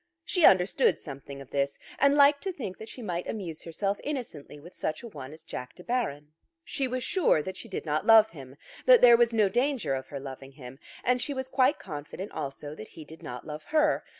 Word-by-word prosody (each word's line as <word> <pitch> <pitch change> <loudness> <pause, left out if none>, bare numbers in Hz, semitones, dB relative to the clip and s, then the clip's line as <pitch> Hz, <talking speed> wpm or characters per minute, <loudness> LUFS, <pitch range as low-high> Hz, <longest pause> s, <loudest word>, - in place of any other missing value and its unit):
She 355 -4 +3
understood 190 +8 +3
something 140 -1 -9
of 135 - -13
this, 140 0 -1 0.2
and 280 +1 +5
liked 285 0 +6
to 385 - 0
think 235 - -7
that 220 - -9
she 250 - -9
might 180 -3 -3
amuse 175 -8 -5
herself 195 +4 -2
innocently 235 - -6
with 175 +5 -13
such 155 +6 -4
a - - -6
one 145 - -9
as 155 +1 -13
Jack 125 -5 -7
De 180 - -12
Baron. 155 - -2 0.3
She 275 -3 -1
was 255 0 -3
sure 295 - +2
that 190 - -6
she 230 - -8
did 190 - -5
not 155 +6 -1
love 220 -1 +7
him, 135 -4 -11 0.3
that - - +8
there 240 -1 +9
was 235 0 +3
no 220 -3 +3
danger 245 - 0
of 130 0 -4
her 140 - -6
loving 135 0 -9
him; 135 -1 -11 0.2
and 250 0 +2
she 285 - -2
was 260 0 -3
quite 260 +1 +3
confident 155 +3 -7
also 145 0 -6
that 110 - -9
he 160 - -12
did 160 +2 -13
not 125 0 -7
love 150 0 -7
her. 305 -1 +2
185 Hz, 225 wpm, -28 LUFS, -, 0.3 s, there